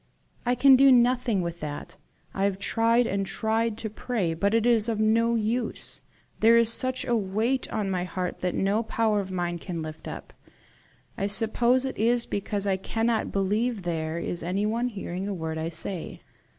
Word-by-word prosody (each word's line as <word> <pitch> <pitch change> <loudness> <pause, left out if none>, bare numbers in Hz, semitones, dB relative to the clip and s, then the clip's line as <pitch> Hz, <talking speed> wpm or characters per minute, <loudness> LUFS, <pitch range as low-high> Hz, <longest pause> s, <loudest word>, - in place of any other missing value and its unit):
'" - - -36
"I 245 - +3
can 265 +2 +7
do 270 +1 +6
nothing 245 -4 +3
with 170 0 -5
that. 150 -2 -7 0.4
I 195 - 0
have 200 -1 0
tried 230 +4 +2
and 200 -2 -1
tried 220 +2 -1
to 220 - -4
pray, 210 -7 -2
but 200 +6 0
it 230 0 +2
is 235 -2 +4
of 220 -2 -1
no 230 +2 +2
use. 230 +2 -2 0.4
There 230 +1 +6
is 230 0 +4
such 255 +1 0
a 240 -2 +1
weight 220 +5 -1
on 205 -3 -2
my 180 -1 -1
heart 180 0 -4
that 180 -1 -2
no 200 +3 +1
power 220 -2 0
of 195 -1 -4
mine 175 -2 -3
can 170 -2 -5
lift 155 0 -8
it - - -4
up. - - -11 0.9
I 200 - 0
suppose 235 +5 +3
it 265 - -5
is 235 +2 +2
because 200 0 -3
I 195 -1 +1
cannot 225 +3 -1
believe 205 +3 0
there 160 -2 -3
is 170 0 -4
anyone 210 +7 -1
hearing 195 -4 -5
a 205 - -3
word 160 -2 -4
I 160 +1 -2
say. 165 +1 -4
210 Hz, 190 wpm, -26 LUFS, 185-235 Hz, 0.9 s, can